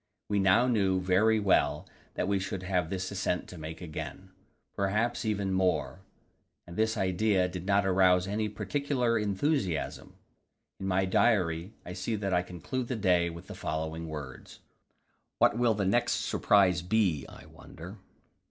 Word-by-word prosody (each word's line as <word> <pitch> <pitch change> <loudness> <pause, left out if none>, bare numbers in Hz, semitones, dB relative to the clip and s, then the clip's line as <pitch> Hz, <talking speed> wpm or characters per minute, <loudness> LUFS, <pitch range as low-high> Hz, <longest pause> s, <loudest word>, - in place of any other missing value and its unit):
We 105 -1 +1
now 95 +5 +4
knew 100 -6 +2
very 100 +5 +3
well 75 -7 +2 0.3
that - - -1
we 100 -1 +1
should 95 0 -4
have 90 -3 0
this 95 +1 -3
ascent 95 -2 -2
to 90 - -10
make 80 +2 -7
again, 90 +3 -7 0.4
perhaps 105 +5 0
even 100 -3 -1
more; 95 0 0 0.7
and 85 - -10
this 110 +2 +1
idea 95 0 +2
did 90 0 -7
not 100 0 +3
arouse 90 -1 +4
any 105 +2 -1
particular 125 +1 -1
enthusiasm. 100 - -1 0.6
In 95 - -4
my 95 0 +2
diary 95 -2 +1
I 90 - -6
see 90 +5 -2
that 100 -2 -2
I 90 - +3
conclude 90 +8 -5
the 125 - -2
day 90 -5 +2
with 85 0 -9
the - - -9
following 80 +1 -4
words 75 -4 -8 0.8
"What 115 - +3
will 120 -3 +3
the 100 -2 -1
next 110 +6 +2
surprise 95 -4 +3
be, 90 -6 +1
I - - -13
wonder?" - - -12
95 Hz, 155 wpm, -29 LUFS, 90-105 Hz, 0.8 s, now